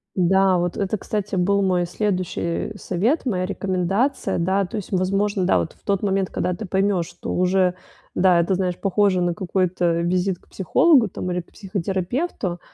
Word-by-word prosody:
Да, 190 +1 +3
вот 175 0 -1
это, 200 +1 -1
кстати, 205 0 -3
был 200 +2 +2
мой 180 -2 +1
следующий 185 -2 -2
совет, 210 - 0
моя 185 -7 0
рекомендация. 195 +7 -1
Да, 190 +3 +1
то 220 - -6
есть, 205 - -6
возможно, 195 +1 +1
да, 185 - +3
вот - - -3
в - - -31
тот 200 -2 0
момент, 195 -2 0
когда 180 - -1
ты 195 +5 -6
поймешь, 190 -1 +1
что - - -7
уже, 180 0 +2 0.4
да, 180 -2 +4
это, 170 +3 +1
знаешь, 180 -1 -1
похоже 195 -1 +2
на 175 -1 +1
какой-то 180 -2 0
визит 180 +1 0
к - - -28
психологу 240 - +4
там 180 0 -4
или 180 0 -1
к 170 - -23
психотерапевту, 195 - -3
190 Hz, 175 wpm, -22 LUFS, 180-200 Hz, 0.4 s, да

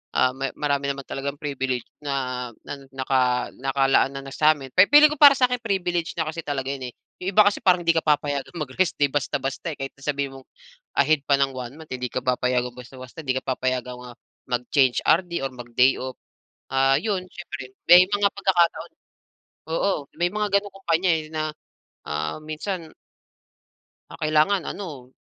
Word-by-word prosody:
ah 130 - +4
ma 135 0 -2
marami 140 -1 0
naman 140 0 -7
talagang 140 +1 -4
privilege 130 -4 -2 0.2
na 130 -3 -3 0.2
na 140 - -6 0.2
naka 130 -2 +1
nakalaan 135 0 +2
na 135 - -5
na 135 - -8
sa'min, 150 -4 +2
pi 185 +2 +6
feeling 295 +1 +8
ko 300 - -8
para 285 -2 +10
sa'kin 250 -1 +2
privileged 175 -5 -1
na 160 - +1
kasi 165 - -6
talaga 135 -2 -3
yun 130 -2 -5
eh. - - -40 0.3
Yung 185 - -1
iba 215 - +8
kasi 205 - +1
parang 180 -2 +4
hindi 165 - +5
ka - - +1
papayagang 145 0 0
mag-rest 150 +4 -1
day 145 -1 +3
basta 145 -1 -1
basta 135 +4 -3
eh. - - -13
Kahit 135 0 -4
na 140 - -17
sabihin 140 -2 -1
mong 130 - -20 0.5
ahead 145 +2 +4
pa 140 - +5
ng 135 -1 +2
one-month 130 +5 -8
hindi 125 -1 -3
ka 130 - -3
papayagang 125 -1 0
basta-basta 130 +4 -10
di 130 - +1
ka - - -4
papayagang 125 -1 -2
ah, 120 - -11 0.3
mag-change 125 +1 +2
RD 170 -2 +2
or 135 - -3
mag 120 -1 -10
day 130 +2 +5
off. 130 0 -5 0.6
Ah 135 0 +4
yun, 190 +1 -1
siyempre 135 -8 -9
may 180 +1 +9
mga 205 0 +3
pagkakataon 185 -4 +1 0.8
oo 165 -3 0 0.2
may 175 - +3
mga 210 0 0
ganong 205 0 -10
kumpanya 185 -1 0
eh 160 -1 -2
na 155 0 -1 0.6
ah 75 - -3
minsan 160 +2 -5 1.2
ah, 165 - -10
kailangan 155 +5 +3
ano. 145 -11 -8
140 Hz, 180 wpm, -24 LUFS, 130-170 Hz, 1.2 s, para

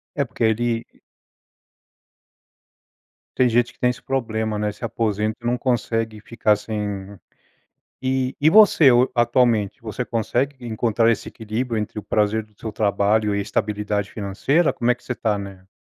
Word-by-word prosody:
É 140 - +1
porque 115 -1 -2
ele 115 +1 0 2.5
tem 125 -1 +3
gente 120 +1 +1
que - - -32
tem 125 - +3
esse 125 - -4
problema, 110 -5 -2
né, 105 0 -1
se 110 +3 -7
aposenta 110 -1 -1
e - - -11
não 120 +1 +1
consegue 115 -3 -1
ficar 110 -2 +1
sem 105 -2 -5 0.9
E 130 0 0
e 150 - +5
você 195 -7 +7 0.3
atualmente, 120 -4 +2
você 115 +2 -4
consegue 125 +4 -2
encontrar 115 0 +1
esse 115 - -2
equilíbrio 115 +1 -3
entre 105 0 -4
o - - -5
prazer 105 +1 0
do 105 -1 -30
seu 110 - -6
trabalho 105 0 +1
e 100 - 0
a - - 0
estabilidade 105 -1 -2
financeira? 115 - +1
Como 120 - 0
é - - +4
que 125 - -25
você 125 - -3
tá, 105 -4 -1
né? 95 -2 -9
110 Hz, 160 wpm, -22 LUFS, 105-120 Hz, 2.5 s, você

